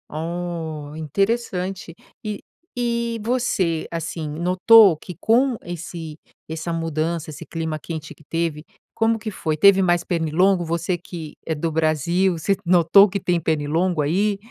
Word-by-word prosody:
Oh, 160 -2 -4
interessante, 190 - -2 0.3
e 210 -1 -5 0.3
e 235 -1 -1
você, 205 -9 0
assim, 165 -1 -4
notou 180 +5 +6
que 180 +1 -10
com 245 +2 +2
esse 165 -2 -7 0.3
essa 160 +1 -4
mudança 165 0 -2
esse 150 - -9
clima 160 -2 -3
quente 155 0 -7
que - - -21
teve, 165 -1 -2 0.3
como 225 0 +2
que 215 0 -5
foi? 160 -5 -2
Teve 195 +3 +6
mais 175 -2 +2
pernilongo, 175 +2 +1
você 170 +2 -1
que 165 -3 -9
é 160 - -1
do 160 +2 -2
Brasil, 165 +4 +1
você 195 +5 +1
notou 180 +3 +6
que 200 +1 -2
tem 175 -1 0
pernilongo 160 +2 0
aí? 195 +7 +1
170 Hz, 140 wpm, -22 LUFS, 160-195 Hz, 0.3 s, notou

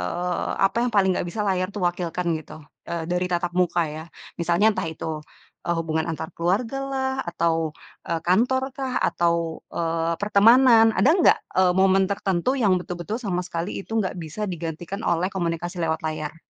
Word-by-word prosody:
eee, 175 - -2 0.2
apa - - -5
yang 245 - 0
paling 190 -2 +4
nggak - - -2
bisa 210 +4 -4
layar 185 0 0
itu 205 - -5
wakilkan, 175 0 -1
gitu? 155 - -12 0.4
Eee, 170 -1 -3
dari 180 +1 +1
tatap 175 0 -1
muka, 175 -1 +2
ya. 155 +1 -6 0.4
Misalnya 170 +5 +2
entah - - -1
itu, - - -9 0.6
eee, 170 - 0
hubungan 160 -1 -1
antar 160 0 -4
keluarga 200 +10 0
lah, 265 -1 -1 0.2
atau, 165 -2 0 0.3
eee, 165 -1 -2
kantor 245 +9 +3
kah, 265 -2 -3
atau, 170 -1 +2 0.4
eee, 165 0 -1
pertemanan, 225 +3 +6
ada 265 - +4
enggak, 355 - +5 0.2
eee, 185 -1 +4
momen 190 0 +4
tertentu 195 +4 0
yang 200 -3 +4
betul-betul 180 +5 -5
sama 195 -7 -2
sekali 170 +2 -4
itu 225 +3 -5
enggak 200 -4 0
bisa 165 +6 -5
digantikan 170 +4 -5
oleh 170 +2 +1
komunikasi 175 -1 -3
lewat 160 -1 -1
layar? 155 0 -3
180 Hz, 170 wpm, -24 LUFS, 165-200 Hz, 0.6 s, pertemanan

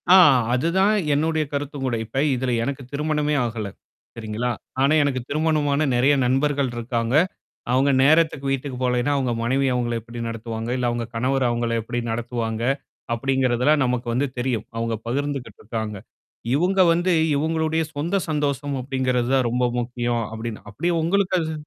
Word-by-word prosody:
ஆ - - +10 0.4
அதுதான் 190 +10 +2 0.2
என்னுடைய 155 +1 +1
கருத்தும் 140 -1 -3
கூட. 120 -2 0
இப்ப 135 +5 -2
இதுல 125 0 -1
எனக்கு 140 +1 -3
திருமணமே 150 0 0
ஆகல. 110 -3 -3 0.5
சரிங்களா? 115 +2 -2 0.3
ஆனா 140 +3 +4
எனக்கு 130 -3 0
திருமணமான 155 -1 +1
நெறைய 135 +4 +4
நண்பர்கள் 135 +1 +1
இருக்காங்க. 120 +1 -1 0.6
அவங்க 135 +2 +3
நேரத்துக்கு 155 -2 +3
வீட்டுக்கு 135 -1 -3
போலன்னா, 125 +2 +1
அவுங்க 130 -3 0
மனைவி 135 +3 +1
அவங்கள 120 -1 -1
எப்படி 120 +1 -9
நடத்துவாங்க, 115 0 -5
இல்ல, 125 -1 -1
அவுங்க 120 -1 -2
கணவர் 130 +2 +1
அவங்கள 120 0 -1
எப்படி 120 +2 -3
நடத்துவாங்க, 115 -1 -3 0.5
அப்படிங்கிறதெல்லாம் 130 +3 +2
நமக்கு 125 -1 -1
வந்து 140 +3 +1
தெரியும். 120 -4 -1
அவங்க 115 0 -1
பகிர்ந்துகிட்டு 140 +1 -3
இருக்காங்க. 110 -1 -4 0.6
இவுங்க 185 +4 +2
வந்து 175 +1 +1 0.2
இவங்களுடைய 160 +1 0
சொந்த 165 +7 -1
சந்தோஷம் 145 -2 -1
அப்படிங்கிறது 130 -2 0
தான் 130 -2 +2
ரொம்ப 125 +1 0 0.2
முக்கியம். 120 -1 -1
அப்டின்னு. 110 0 -6
அப்பிடியே 170 +12 -1
உங்களுக்கு 190 +2 +1
அது 160 0 -3
130 Hz, 145 wpm, -23 LUFS, 120-145 Hz, 0.6 s, ஆ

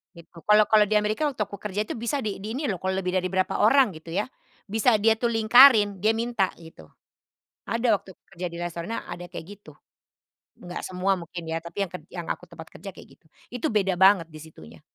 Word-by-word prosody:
Gitu 170 0 -15
kalau 210 0 +6
kalau 215 -1 +6
di 215 - 0
Amerika 210 +8 +1
waktu 270 -6 -4
aku 200 0 -9
kerja 210 0 -3
itu - - -6
bisa 235 +4 -2
di 210 -3 -4
di 215 +4 -6
ini 285 - -3
loh, 190 -4 -3
kalau 190 +1 -2
lebih 180 -1 -2
dari 185 0 -1
berapa 185 0 -1
orang 250 +2 +5
gitu 160 +1 -12
ya, 205 +4 0 0.4
bisa 220 +3 +2
dia 225 +2 +4
tuh 240 - +1
lingkarin 220 -3 +6
dia 215 +3 +2
minta 230 -4 0
gitu. 160 - -15 0.8
Ada, 230 -2 +1
waktu 190 - -15 0.2
kerja 180 -1 -6
di 170 -1 -6
restorannya 175 +5 -5
ada 175 - -7
kayak 175 -2 -9
gitu, 205 - -16 0.9
nggak 175 0 -6
semua 185 +1 0
mungkin 170 +1 -8
ya 165 0 -3
tapi 170 +4 -4
yang 185 - -11
ker 180 - -7
yang 175 -2 -7
aku - - -12
tempat 160 -2 -12
kerja 200 - -10
kayak - - -14
gitu. - - -42 0.3
Itu 245 -1 -3
beda 195 -4 +1
banget 190 -3 +5
di 155 - -10
situnya. 150 - -14
195 Hz, 215 wpm, -25 LUFS, 175-220 Hz, 0.9 s, kalau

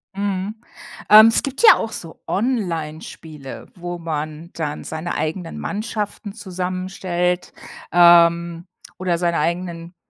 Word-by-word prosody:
Mhm. 200 +1 -2 0.5
Ähm, 215 +1 +10
es 225 - +3
gibt 275 - -4
ja 455 - +10
auch 225 - -4
so 165 -6 -9
Onlinespiele, 160 - -4
wo 175 -1 -6
man 155 0 -5
dann 150 -3 -4
seine 160 +2 -5
eigenen 160 +3 -3
Mannschaften 210 -1 -4
zusammenstellt, 185 -2 -3 0.4
ähm, 170 0 +5 0.3
oder 180 -2 0
seine 170 -1 0
eigenen, 170 +1 -3
175 Hz, 115 wpm, -21 LUFS, 165-195 Hz, 0.5 s, Ähm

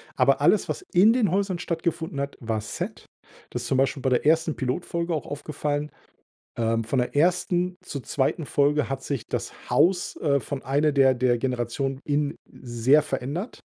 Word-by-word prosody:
Aber - - +3
alles, - - +3
was - - -3
in 200 +6 +6
den 235 -7 +2
Häusern 195 -1 0
stattgefunden 165 -3 -2
hat, 140 0 -3
war 115 -3 -2
Set. 110 - -6 0.4
Das - - -4
ist - - -5
zum 135 - +1
Beispiel 135 +1 +1
bei 130 - +1
der 125 -1 +1
ersten 160 0 +3
Pilotfolge 170 +6 -2
auch 155 - -2
aufgefallen. 145 0 -3 0.7
Ähm, 115 0 +1
von 125 +4 -1
der 125 +3 -1
ersten 180 +2 +2
zur 140 -7 -6
zweiten 145 +6 -1
Folge 145 -1 +2
hat 135 0 -4
sich 140 -6 -4
das - - -3 0.2
Haus, 180 +1 +2
äh, 140 -3 +2
von 140 +1 -5
einer 145 +3 +2
der 135 -2 +5
der 125 -1 +2
Generationen 130 +2 -2
Innen 145 0 0
sehr 125 +5 +2
verändert. 145 - -4
145 Hz, 175 wpm, -25 LUFS, 130-165 Hz, 0.7 s, in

